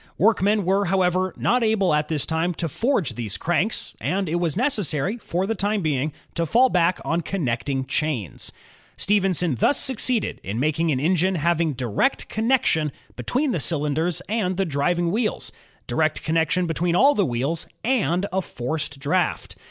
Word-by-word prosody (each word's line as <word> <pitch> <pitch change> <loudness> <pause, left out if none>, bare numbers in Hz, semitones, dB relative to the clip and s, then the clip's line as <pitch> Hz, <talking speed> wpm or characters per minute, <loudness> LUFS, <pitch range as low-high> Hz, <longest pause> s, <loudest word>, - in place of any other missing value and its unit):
Work 215 0 +3
men 205 0 +2
were, 195 +2 +2
however, 185 0 +1
not 245 +3 +2
able 215 -6 +2
at 150 0 +1
this 150 -3 0
time 165 +2 -1
to 165 - -2
forge 225 - 0
these 110 -5 -4
cranks, 175 +6 -1
and 190 0 -1
it 165 +2 0
was 170 -1 -1
necessary, 210 - +1
for 185 -3 -2
the 225 - -1
time 205 -1 -1
being, 150 -1 0 0.2
to 165 0 -1
fall 250 - +4
back 180 -2 +2
on 165 +1 0
connecting 135 -6 -2
chains. 130 - -3 0.5
Stephenson 190 -5 +2
thus 285 - +3
succeeded 250 -3 -1
in 100 +5 -3
making 155 +3 +1
an 130 - 0
engine 180 +5 +2
having 170 -1 +1
direct 125 - -1
connection 220 - +1 0.2
between 255 - 0
the 175 - -1
cyUnders 160 +3 0
and 190 -4 -1
the 195 - +1
driving 170 +3 0
wheels, 215 +2 -1 0.3
direct 155 -1 0
connection 165 +2 +1
between 170 +1 0
all 280 +9 +6
the 205 - +2
wheels, 140 +3 -1 0.2
and 200 -7 +1
a 190 - +1
forced 145 0 -4
draft. 155 +6 -1
175 Hz, 165 wpm, -23 LUFS, 155-200 Hz, 0.5 s, all